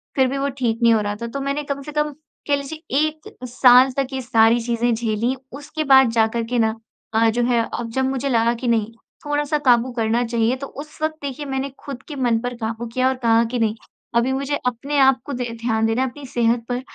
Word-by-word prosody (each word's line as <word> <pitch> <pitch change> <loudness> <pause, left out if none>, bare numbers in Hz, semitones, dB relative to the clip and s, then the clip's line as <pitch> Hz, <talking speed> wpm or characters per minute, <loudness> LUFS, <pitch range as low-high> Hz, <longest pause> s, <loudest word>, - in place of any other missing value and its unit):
फिर 265 -1 +4
भी 275 +2 -3
वो 280 +1 0
ठीक 230 -2 0
नहीं 230 -1 +6
हो 220 - +2
रहा 205 0 -2
था। 235 - -3
तो 275 +4 -5
मैंने 280 +2 -2
कम 280 -1 -4
से 300 - -8
कम 300 0 0 0.4
कह 285 - +3
लीजिए 280 0 -5
1 310 0 -2 0.2
साल 250 +1 +6
तक 275 -1 +1
ये 265 - -2
सारी 230 -1 +4
चीज़ें 235 0 0
झेली 230 +2 -1 0.2
उसके 300 +2 -5
बाद 265 -3 +7
जा 225 -1 +3
कर 230 -1 -1
के 240 +1 -1
ना 220 -1 +2 0.4
अ, 225 +1 +4
जो 240 +2 0
है 240 -1 +2
अब 235 -1 -4
जब 265 +2 0
मुझे 270 +1 -2
लगा 235 -1 +2
कि 245 +1 -5
नहीं 225 -2 +1 0.3
थोड़ा-सा 295 +1 0
काबू 245 0 +4
करना 230 +1 +1
चाहिए 230 +1 +1
तो 275 +1 -6
उस 305 +2 -11
वक़्त 310 0 0
देखिए 280 +1 -5
मैंने 270 0 -3
खुद 275 -3 -8
के 295 - -6
मन 240 -4 +1
पर 245 0 -3
काबू 230 +1 -4
किया 255 0 +2
और 265 - -1
कहा 230 0 +5
कि 245 - -1
नहीं 220 -1 +1 0.4
अभी 240 +3 +2
मुझे 275 +2 -1
अपने 260 +4 -2
आप 265 -1 +5
को 285 - -5
दे 245 - -1 0.2
ध्यान 225 -1 +1
देना 225 +3 +1
है 260 - 0
अपनी 285 +3 -11
सेहत 235 -1 +1
पर। 245 +1 -1
250 Hz, 240 wpm, -21 LUFS, 230-275 Hz, 0.4 s, बाद